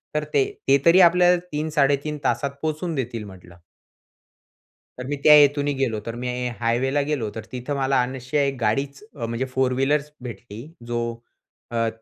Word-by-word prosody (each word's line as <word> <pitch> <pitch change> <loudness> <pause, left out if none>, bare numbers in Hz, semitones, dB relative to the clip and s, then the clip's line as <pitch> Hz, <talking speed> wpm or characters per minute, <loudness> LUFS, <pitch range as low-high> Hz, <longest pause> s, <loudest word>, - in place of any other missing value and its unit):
तर 150 - +1
"ते 140 - +4 0.2
ते 135 +1 +6
तरी 170 +3 +7
आपल्याला 180 +1 +5
3-3.5 150 -1 0
तासात 140 -1 0
पोहचून 160 +1 -2
देतील," 120 -4 -3
म्हटलं. 90 -3 -13 1.4
तर 125 - -6
मी 145 - -2
त्या 150 - +9
हेतूने 145 0 +5
गेलो, 130 -6 -1
तर 115 - -4
मी 125 - -2 0.3
हायवेला 125 +5 +1
गेलो, 140 -8 -2
तर 110 - -6
तिथं 125 +3 -4
मला 135 -1 +2
अनायसे 130 +3 -1
एक 135 -1 -2
गाडीच 135 - -1
अ, 120 -5 -6
म्हणजे 115 +3 -2
फोर 130 -1 +2
व्हीलरच 145 +2 0
भेटली, 120 -2 -8 0.2
जो 120 0 -2 0.7
अ, 115 -1 0
135 Hz, 160 wpm, -23 LUFS, 120-150 Hz, 1.4 s, त्या